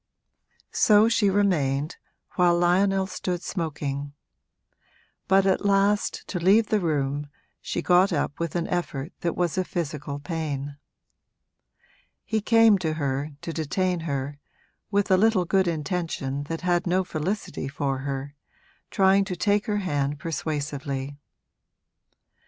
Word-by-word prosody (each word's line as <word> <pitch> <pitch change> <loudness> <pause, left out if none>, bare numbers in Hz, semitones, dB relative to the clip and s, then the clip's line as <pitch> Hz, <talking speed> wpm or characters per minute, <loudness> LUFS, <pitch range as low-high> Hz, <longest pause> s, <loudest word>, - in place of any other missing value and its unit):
So 210 -1 +5
she 230 -3 +3
remained, 155 -8 +1 0.3
while 175 -1 +3
Lionel 190 +2 +3
stood 180 -1 -4
smoking; 145 -5 -4 1.1
but 195 0 +4
at 190 +1 +2
last, 200 +1 +1
to 180 - -2
leave 205 +6 +4
the 215 - +2
room, 145 -4 -1 0.3
she - - -3
got 180 +2 +4
up 145 -2 -1
with 170 -2 -3
an 170 -1 -1
effort 165 -3 -3
that 170 - -2
was 175 0 0
a - - +2
physical 150 -5 -4
pain. 145 -3 -4 1.5
He 220 -1 0
came 225 -1 +5
to 160 -3 -1
her, 145 -1 -2
to 165 - -4
detain 175 +4 -1
her, 145 -2 -4 0.5
with 200 -1 +1
a 185 - +6
little 210 -2 +3
good 190 +1 +2
intention 155 -4 -2
that 165 +2 -4
had 175 0 +1
no 185 +2 +2
felicity 180 -2 -3
for 135 -1 -2
her, 140 +1 -4 0.6
trying 195 -1 +4
to 190 -2 -4
take 205 +2 +1
her 210 -1 0
hand 145 -7 -1
persuasively. 145 -3 -4
170 Hz, 130 wpm, -25 LUFS, 145-190 Hz, 1.5 s, a